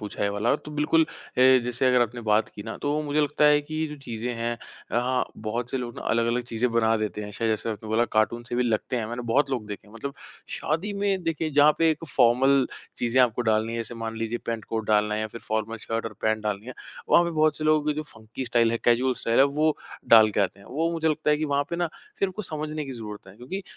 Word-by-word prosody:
पूछा 105 -1 -5
ये 100 - +2
वाला, 105 +6 +1
तो 150 - -11
बिल्कुल 150 +2 +3
अ, 155 - -1 0.6
जैसे 125 +1 0
अगर 125 -1 +4
आपने 120 +1 -4
बात 105 +1 +3
की 105 - -10
ना, 110 0 -6
तो 145 - -2
वो 150 - 0
मुझे 150 0 0
लगता 150 0 +1
है 150 0 +6
कि 155 +2 -9
ये 160 0 0
जो 150 - -8
चीज़ें 115 -1 -4
हैं 115 +1 -2 0.4
अ, 120 - +3
हाँ, 125 +1 +1
बहुत 115 +3 -4
से - - -1
लोग 120 -2 -4
ना - - -6
अलग-अलग 115 +1 +1
चीज़ें 115 +2 0
बना 115 -1 +3
देते 105 -1 -3
हैं। 105 - -7
शायद 115 +2 -1
जैसे 110 +1 -1
आपने 110 0 -7
बोला 110 +2 +2
कार्टून 110 +2 +1
से - - -3
भी 125 - +3
लगते 120 +2 -1
हैं, 115 -3 -2
मैंने 120 +2 -5
बहुत 140 +1 +3
लोग 120 -6 -2
देखे 105 0 -7
हैं, 105 - -17
मतलब 140 +5 -6 0.3
शादी 175 +7 -2
में 200 -2 0
देखिए 165 -1 -1
जहाँ 145 +1 +6
पे 165 -1 +4
एक 155 +1 -3
फॉर्मल 130 +2 +4 0.3
चीज़ें 120 +2 +2
आपको 120 0 +1
डालनी 110 0 +1
है, 115 - -3
जैसे 115 +1 -5
मान 115 -1 -5
लीजिए 115 +1 -2
पैंट-कोट 115 -1 -3
डालना 105 0 +2
है 105 - -1
या 110 - -1
फिर 115 - -6
फॉर्मल 110 +1 -2
शर्ट 115 0 -2
और 115 - -4
पैंट 110 0 +1
डालनी 105 +1 -3
है, 130 - -7 0.3
वहाँ 175 - +6
पे 170 - -1
बहुत 155 -2 +2
से 155 - -5
लोगों 155 -1 +3
की 150 - +1
जो 155 - -3
फ़ंकी 115 -2 -8
स्टाइल 115 -1 +2
है, 115 - 0
कैजुअल 125 +2 +3
स्टाइल 115 0 +1
है, 135 - +8
वो 150 +2 +1 0.3
डाल 110 -2 +8
के 105 - 0
आते 100 0 -1
हैं। - - -16
वो 160 +6 -1
मुझे 160 -1 0
लगता 155 0 0
है 150 - +4
कि 155 - -2
वहाँ 145 -1 +1
पे 170 - -2
ना 175 -1 0 0.3
फिर 195 -1 +1
कुछ 205 0 -4
समझने 155 0 -4
की 135 - -6
ज़रूरत 105 -4 -8
है 95 - -14
क्योंकि 160 - -6
120 Hz, 270 wpm, -26 LUFS, 110-150 Hz, 0.6 s, है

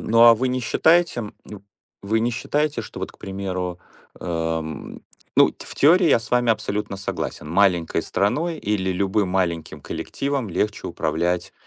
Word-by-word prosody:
но 115 +1 +6
а 115 - +8
вы 130 +3 -1
не 130 0 -1
считаете, 160 +4 +3
м, 105 -3 -7
ну 105 -2 -10 0.4
вы 110 +3 +1
не 120 +2 +1
считаете, 145 +5 -1
что - - -9
вот, - - -5
к - - -22
примеру, 95 -2 -4 0.4
эм 80 -2 -3 0.4
Ну - - +6
в - - -10
теории 170 +4 +5
я 140 - +5
с 115 - -11
вами 120 -1 +3
абсолютно 105 -2 -2
согласен- 95 -5 -5
маленькой 90 -1 +2
страной 155 - 0
или 100 -5 -1
любым 95 +2 0
маленьким 90 -3 -1
коллективом 140 -5 -3
легче 105 +3 -2
управлять, 90 +3 -1
105 Hz, 160 wpm, -23 LUFS, 90-120 Hz, 0.4 s, а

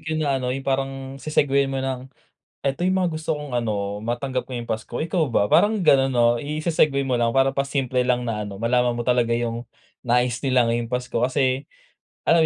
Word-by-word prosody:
teknik - - -21
'yon 155 0 -1
na 145 - 0
ano 125 - -3
'yong 135 +1 -3
parang 135 0 0 0.3
se-segueyan 140 -1 +2
mo 135 - -3
ng, 130 0 -4 0.6
"Eto 140 +6 0
'yong 190 - +2
mga 175 - 0
gusto 160 0 -1
kong 150 -2 -7
ano, 105 -4 -2
matanggap 120 +4 -3
ngayong 125 -2 -5
Pasko. 110 +2 -5
Ikaw 165 -1 0
ba?" 105 -4 +1
Parang 210 -2 +4
gano'n, 135 -4 +5
'no? 120 -1 +5
Ise-segue 150 -1 +1
mo 125 -2 0
lang, 115 +1 +1
parang 135 0 +4
pa-simple 135 -2 -1
lang 125 -1 +1
na 105 -3 -3
ano 100 - -7
malaman 125 0 +2
mo 120 - -3
talaga 120 -1 +2
'yong 115 0 -3 0.4
nais 125 0 +2
nila 130 -3 +3
ngayong 115 0 -1
Pasko 125 0 -2
kasi, 130 +2 +1 0.5
alam 165 -1 +4
130 Hz, 200 wpm, -23 LUFS, 120-140 Hz, 0.6 s, gano'n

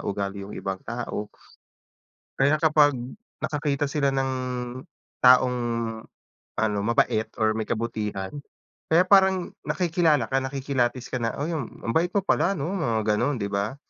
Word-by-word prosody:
ugali 100 0 -3
yung - - -8
ibang 95 -1 -4
tao. 115 -3 -5 1.1
Kaya 145 +3 +3
kapag, 150 -2 +5 0.5
nakakita 145 -1 -1
sila 140 -2 +1
ng 135 0 0 0.9
taong 125 0 +6 1.0
ano, 105 -2 +1
mabait 110 0 +1
or 110 0 +3
may 110 -1 -3
kabutihan, 105 -4 -3 0.6
kaya 170 +3 +5
parang 190 -1 +4 0.2
nakikilala 165 -7 +2
ka, 135 - +3
nakikilatis 130 -2 -2
ka 125 - -1
na, 115 - -1
uy! 155 +4 -2
Ang 145 -8 -3 0.2
ang 115 - -1
bait 170 +2 +3
mo 200 -1 0
pala 195 0 +2
'no? 160 +6 -3
Mga 120 - 0 0.2
ganon, 145 +4 0
'di 100 -2 -4
ba? 100 +7 -1
130 Hz, 140 wpm, -25 LUFS, 110-155 Hz, 1.1 s, taong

